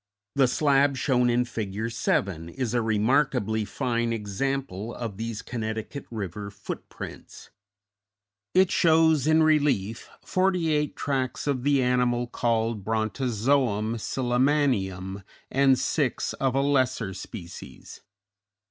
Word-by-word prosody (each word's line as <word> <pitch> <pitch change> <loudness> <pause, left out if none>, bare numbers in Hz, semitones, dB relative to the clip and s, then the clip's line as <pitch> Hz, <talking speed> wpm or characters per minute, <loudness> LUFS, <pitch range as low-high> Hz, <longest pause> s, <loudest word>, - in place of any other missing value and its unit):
The 135 -2 +4
slab 140 +1 +3
shown 125 -1 +2
in 120 +1 +2
Fig. 110 -1 -4
7 95 -7 -1
is 125 +2 -3
a 120 - +2
remarkably 110 0 +1
fine 120 -1 -1
example 115 0 -3
of 115 -5 -5
these 115 -1 -4
Connecticut 110 +3 -5
River 100 -2 -5
footprints; 100 0 -9 1.0
it 185 0 +5
shows 160 -3 +4
in 160 0 +5
relief 140 -9 +1 0.2
forty 185 -4 +1
eight 150 -1 0
tracks 130 -3 -2
of 140 -3 0
the 140 0 +2
animal 125 -1 +2
called 115 -3 -1
Brontozoum 115 0 0
sillimanium 120 -8 0 0.3
and 135 -1 +4
six - - 0
of 135 -1 -1
a 135 - +3
lesser 130 -8 +1
species. 85 - -10
120 Hz, 110 wpm, -26 LUFS, 110-140 Hz, 1.0 s, it